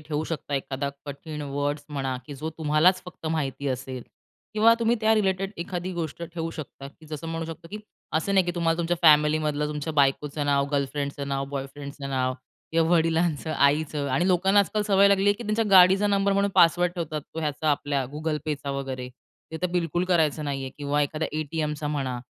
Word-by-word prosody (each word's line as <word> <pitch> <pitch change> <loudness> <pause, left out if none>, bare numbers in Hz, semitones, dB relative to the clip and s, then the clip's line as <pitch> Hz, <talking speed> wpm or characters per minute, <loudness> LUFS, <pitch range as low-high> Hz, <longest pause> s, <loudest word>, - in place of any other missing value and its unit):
ठेऊ 150 0 -3
शकता. 150 -3 -4
एखादा 135 +1 -2 0.2
कठीण 150 +2 -6
वर्ड्स 145 +1 -2
म्हणा, 135 -3 -2
की 145 - -7
जो 155 +4 -5
तुम्हालाच 160 +4 +3
फक्त 170 -2 -9
माहिती 140 -3 -2
असेल, 130 -1 -4 0.5
किंवा 225 +2 +6
तुम्ही 230 +1 +2
त्या 220 0 +4
रिलेटेड 195 -1 0
एखादी 180 0 -4
गोष्ट 170 -1 -4
ठेवू 165 0 -4
शकता. 140 -3 -8 0.2
जसं 155 +1 -6
म्हणू 165 0 -3
शकतो, 165 +1 -9
की 210 - -5 0.4
असं 195 +5 0
नाही 190 -2 +5
की - - +1
तुम्हाला 165 -1 +1
तुमच्या 170 +1 0
फॅमिलीमधलं, 150 -1 +4
तुमच्या 150 +1 -4
बायकोचं 145 +1 +1
नाव, 140 -1 +3
गर्लफ्रेंडचं 140 0 -2
नाव, 135 0 -1
बॉयफ्रेंडचं 140 0 -6
नाव, 130 -1 0 0.4
किंवा 165 0 +3
वडिलांचं, 165 -1 +1
आईचं. 145 0 +2
आणि 155 +8 +1
लोकांना 190 +3 +4
आजकाल 210 +3 0
सवय 200 -1 +5
लागली 200 +1 +4
की 215 - -8
त्यांच्या 220 0 0
गाडीचा 190 +2 +7
नंबर 200 -1 +2
म्हणून 200 0 +2
पासवर्ड 175 +1 +4
ठेवतात. 155 -4 -3
तो 160 - -3
ह्याचा 150 0 0
आपल्या 145 -1 0
Google 155 0 -2
Payचा 145 -2 -3
वगैरे, 135 -2 -4 0.4
ते - - -3
तर - - +3
बिलकुल 175 0 0
करायचं 160 -4 +1
नाहीये, 135 -2 -3
किंवा 145 +1 0
एखाद्या 155 +2 -2
ए-टी-एमचा 150 -1 -2
म्हणा. 135 -4 -2
155 Hz, 180 wpm, -26 LUFS, 140-175 Hz, 0.5 s, गाडीचा